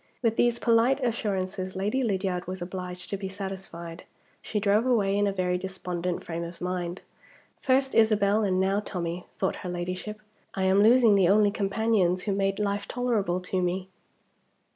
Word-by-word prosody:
With 225 -1 +2
these 240 0 +2
polite 235 +3 +3
assurances 190 -5 -2
Lady 210 +8 0
Lydiard 190 -5 -1
was 185 +1 -5
obliged 180 0 -6
to 200 - -1
be 195 -1 -5
satisfied. 190 -3 -7 0.4
She 210 - -2
drove 210 +4 +2
away 205 -6 +2
in 205 0 +2
a - - +1
very 180 -2 0
despondent 180 -2 -4
frame 170 0 -4
of 170 +1 -8
mind. 180 0 -3 0.6
"First 265 +1 +2
Isabel, 215 -1 +3
and 185 -2 +1
now 195 +2 +2
Tommie," 175 -3 -4
thought 190 - -1
her 180 - -6
Ladyship. 180 +4 -4 0.4
"I 190 - -1
am 190 +1 +4
losing 230 0 +6
the 190 -3 +4
only 205 0 +5
companions 200 -3 +1
who 205 - -1
made 195 0 0
life 200 -1 -1
tolerable 220 -8 0
to 185 +1 -2
me." 180 +1 -2
195 Hz, 165 wpm, -27 LUFS, 180-210 Hz, 0.6 s, losing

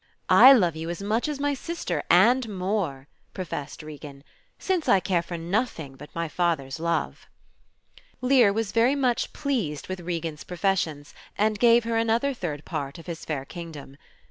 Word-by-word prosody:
"I 265 - +10
love 180 - +4
you 160 +1 -5
as 175 +3 -5
much 220 +7 0
as 295 -2 -3
my 285 0 0
sister 335 +5 -3
and 230 +7 +5
more," 180 -8 -2 0.3
professed 155 -5 -6
Regan, 145 -2 -10 0.3
"since 370 -4 -1
I 195 - +6
care 180 -2 0
for 170 0 -6
nothing 170 - -2
but 150 +2 -12
my 170 0 -2
father's 155 -4 -1
love." 170 +1 -2 0.9
Lear 255 -5 +4
was 220 0 -2
very 235 +4 +3
much 255 -4 0
pleased 230 - -3
with 185 0 -4
Regan's 165 -3 -4
professions, 175 -5 -2 0.2
and 210 0 +1
gave 235 0 +5
her 230 0 -1
another 230 +5 +1
third 155 - -5
part 140 -5 -4
of 165 - -12
his 170 -2 -7
fair 140 -4 -3
kingdom. 155 -5 -9
180 Hz, 165 wpm, -25 LUFS, 160-230 Hz, 0.9 s, I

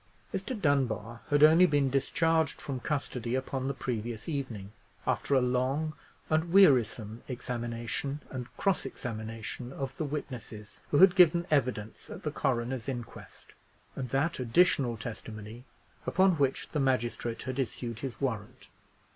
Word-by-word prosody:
Mr. 255 -5 -3
Dunbar 120 - 0
had 145 0 +4
only 165 +4 +8
been 145 -4 +2
discharged 160 +3 +1
from 135 -3 -4
custody 125 -4 -2
upon 130 0 -2
the 140 - 0
previous 115 -3 -4
evening, 125 - -4 0.3
after 140 - +1
a 130 - +5
long 130 +5 0 0.3
and 160 +2 +1
wearisome 120 - +4
examination 120 +2 -3
and 125 -1 -5
cross 195 -2 +1
examination 115 +1 -6
of 135 -1 -5
the - - -1
witnesses 125 -8 -6
who 145 - +2
had 185 +2 +8
given 175 -2 +5
evidence 120 -7 0
at - - -8
the 150 - -1
coroner's 130 -3 -1
inquest, 120 -4 -8 0.4
and 130 -2 -4
that 140 +6 0
additional 125 -2 +3
testimony 110 0 -7 0.4
upon 190 +1 +4
which 140 -6 0
the 150 - -1
magistrate 120 -3 0
had 130 +1 -4
issued 120 -2 -3
his 130 -4 -5
warrant. 125 -2 -4
130 Hz, 140 wpm, -30 LUFS, 115-145 Hz, 0.4 s, only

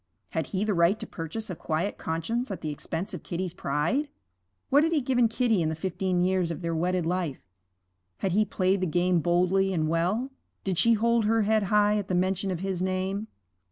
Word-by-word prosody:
Had - - -2
he 195 0 -1
the 215 -1 +1
right 175 +4 +3
to - - -5
purchase 185 +6 -5
a - - -4
quiet 160 +5 -2
conscience 230 +11 -2
at 195 - -5
the 155 - -3
expense 170 +7 -5
of 180 - -5
Kitty's 180 0 -4
pride? 170 - 0 0.6
What 285 +3 +6
had 325 +1 +1
he 310 - +3
given 245 -3 +2
Kitty 225 -3 +1
in 155 - +1
the 160 - -2
fifteen 180 +1 -1
years 185 -2 +1
of 170 +1 -5
their 165 0 -1
wedded 175 +1 0
life? 170 -5 -2 0.7
Had 190 - -1
he 210 +4 +4
played 190 -1 0
the 185 - +1
game 175 +2 +2
boldly 180 +3 +2
and 155 -3 0
well? 180 - 0 0.3
Did 190 -3 0
she 230 - +5
hold 230 0 +2
her 225 +1 +3
head 220 +1 +3
high 210 0 +4
at 200 - -5
the 185 - 0
mention 185 +2 0
of 180 -2 -3
his 190 -2 -2
name? 190 +3 -1
185 Hz, 210 wpm, -27 LUFS, 170-215 Hz, 0.7 s, What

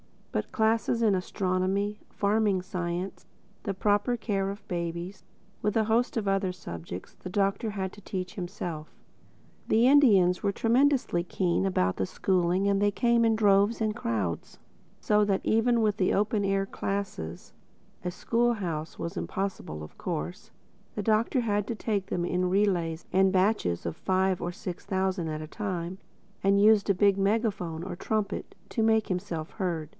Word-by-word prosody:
But - - -1
the - - -31
classes 225 +1 +1
in 215 -3 +4
astronomy, 190 +2 -1
farming 205 -2 +1
science, 180 0 -4 0.4
the 200 - -2
proper 205 +5 +1
care 200 -4 -1
of 200 +1 -8
babies, 170 +2 -4 0.4
with 210 0 0
a 220 - +4
host 225 +3 +1
of 215 -3 -1
other 195 -1 +1
subjects, 85 - -8
the 185 - -9
Doctor 200 +3 0
had 190 -2 -3
to 205 - -13
teach 185 -2 -5
himself. 175 -4 -5 0.7
The 225 +2 +4
Indians 205 -11 +5
were 200 -1 0
tremendously 245 -6 +2
keen 180 +1 0
about 95 - +1
the 95 - 0
schooling 185 - +1
and 200 0 +2
they 205 0 +3
came 235 +2 +3
in 225 -1 +3
droves 205 +1 +3
and 215 -1 +1
crowds; 100 -8 -3 0.4
so 210 0 +3
that 195 -2 +1
even 230 +1 +3
with 210 -1 +1
the 185 - +2
open 205 0 +1
air 195 0 +1
classes 190 - -4 0.5
(a 180 - -1
school 235 +6 +1
house 165 -7 -4
was 170 - -5
impossible 190 - -4
of 75 - -12
course) 80 +4 -4 0.5
the 210 - -2
Doctor 225 +4 +2
had 210 -3 0
to 235 - -2
take 205 -3 -2
them 175 - -1
in 180 +1 0
relays 180 -4 +1
and 190 0 +4
batches 185 - +1
of 85 - -3
five 190 -1 +1
or 175 - -3
six 175 0 -6
thousand 190 -3 -1
at 155 0 -3
a 155 - -6
time 185 -2 -4 0.4
and 195 +1 +4
used 210 -1 +5
a - - +6
big 200 +1 +4
megaphone 195 -5 0
or 180 -1 -6
trumpet 210 0 -2
to 225 - -1
make 220 -1 +3
himself 170 -3 -3
heard. 170 -6 -3
195 Hz, 165 wpm, -28 LUFS, 180-210 Hz, 0.7 s, a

